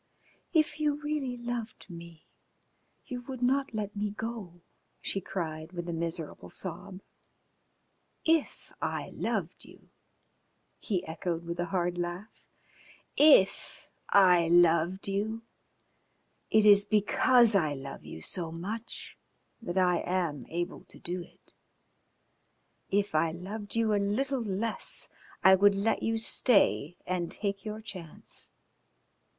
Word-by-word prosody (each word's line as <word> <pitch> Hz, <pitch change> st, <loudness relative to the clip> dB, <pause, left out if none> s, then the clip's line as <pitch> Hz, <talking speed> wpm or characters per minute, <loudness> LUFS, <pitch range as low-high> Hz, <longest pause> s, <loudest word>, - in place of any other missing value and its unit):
"If 310 Hz, -2 st, +2 dB
you 300 Hz, -1 st, +2 dB
really 295 Hz, -4 st, -3 dB
loved 240 Hz, -2 st, -5 dB
me 170 Hz, -2 st, -11 dB, 0.8 s
you 245 Hz, -1 st, -5 dB
would 260 Hz, -2 st, -5 dB
not 270 Hz, +2 st, +2 dB
let 210 Hz, -1 st, -3 dB
me 205 Hz, +1 st, -1 dB
go," 205 Hz, -5 st, -6 dB, 0.4 s
she 195 Hz, -, -3 dB
cried, 160 Hz, -2 st, -5 dB
with 175 Hz, -1 st, -5 dB
a 170 Hz, -, -3 dB
miserable 165 Hz, -1 st, -4 dB
sob. 185 Hz, +1 st, -5 dB, 1.2 s
"If 325 Hz, -2 st, 0 dB
I -, -, -3 dB
loved -, -, -3 dB
you?" -, -, -17 dB, 0.9 s
he 190 Hz, -4 st, -2 dB
echoed, 165 Hz, +1 st, -3 dB
with 170 Hz, +1 st, -5 dB
a 175 Hz, -, +1 dB
hard 175 Hz, -1 st, -1 dB
laugh. 175 Hz, +5 st, -4 dB, 0.8 s
"If 290 Hz, -11 st, +4 dB, 0.2 s
I 180 Hz, -4 st, +6 dB
loved 175 Hz, +2 st, +4 dB
you! 215 Hz, +3 st, -2 dB, 1.1 s
It 215 Hz, -1 st, +4 dB
is 205 Hz, -1 st, +8 dB
because 220 Hz, +3 st, +4 dB
I 155 Hz, -7 st, +2 dB
love 135 Hz, 0 st, -8 dB
you 80 Hz, -, -9 dB
so 165 Hz, -, -2 dB
much 210 Hz, +8 st, -6 dB, 0.4 s
that 185 Hz, -5 st, -4 dB
I 180 Hz, -2 st, +4 dB
am 170 Hz, -8 st, -2 dB
able 175 Hz, +2 st, -4 dB
to -, -, -17 dB
do 180 Hz, +1 st, -4 dB
it. -, -, -14 dB, 1.4 s
If 200 Hz, -1 st, +1 dB
I 160 Hz, +1 st, +2 dB
loved 200 Hz, +5 st, -7 dB
you 225 Hz, -2 st, +2 dB
a 205 Hz, -, +2 dB
little 260 Hz, +6 st, 0 dB
less 220 Hz, +1 st, -1 dB, 0.3 s
I 190 Hz, -, +8 dB
would 200 Hz, +1 st, +5 dB
let 205 Hz, +3 st, +1 dB
you 225 Hz, 0 st, 0 dB
stay 200 Hz, -, +3 dB
and 180 Hz, -2 st, -2 dB
take 200 Hz, -1 st, -1 dB
your 215 Hz, 0 st, -5 dB
chance." 180 Hz, -7 st, -8 dB
195 Hz, 125 wpm, -30 LUFS, 175-225 Hz, 1.4 s, is